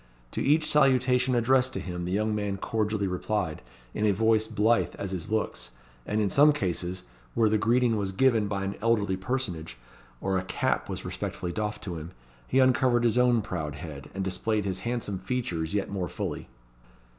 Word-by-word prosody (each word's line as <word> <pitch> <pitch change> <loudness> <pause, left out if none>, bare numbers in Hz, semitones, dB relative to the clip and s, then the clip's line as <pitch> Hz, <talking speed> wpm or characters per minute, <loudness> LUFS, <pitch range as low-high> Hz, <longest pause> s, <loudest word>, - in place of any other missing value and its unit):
To - - -3
each 150 +2 +3
salutation 130 -3 +3
addressed 130 +2 +3
to - - -3
him 90 -1 -5
the 90 - -3
young 110 +3 +1
man 105 -2 -2
cordially 105 0 -1
replied, 95 +2 -2 0.3
in 105 - -2
a - - +5
voice 110 +2 +2
blithe 110 +2 +2
as 100 - -4
his 90 -3 -4
looks; 105 - -2 0.4
and 105 - 0
in 105 - +2
some 150 +1 +6
cases, 90 - -2 0.3
where 110 -2 +4
the 110 0 +2
greeting 120 0 +3
was 100 -2 -1
given 110 0 +3
by 100 -1 -2
an 95 0 -2
elderly 105 -4 +2
personage, 95 - -3 0.4
or 95 +4 0
a - - -4
cap - - -1
was - - -5
respectfully 90 - -4
doffed 105 +2 -3
to 90 -4 -4
him, 80 +4 -9 0.3
he 130 - 0
uncovered 130 -2 +4
his 120 +1 +3
own 120 -3 +4
proud 80 -8 -4
head, 75 -3 -8
and 95 - -2
displayed 105 +2 -1
his 95 -1 -2
handsome 110 -3 -2
features 95 -6 -2
yet 100 - 0
more 95 -3 -2
fully. - - -5
105 Hz, 185 wpm, -28 LUFS, 95-120 Hz, 0.4 s, some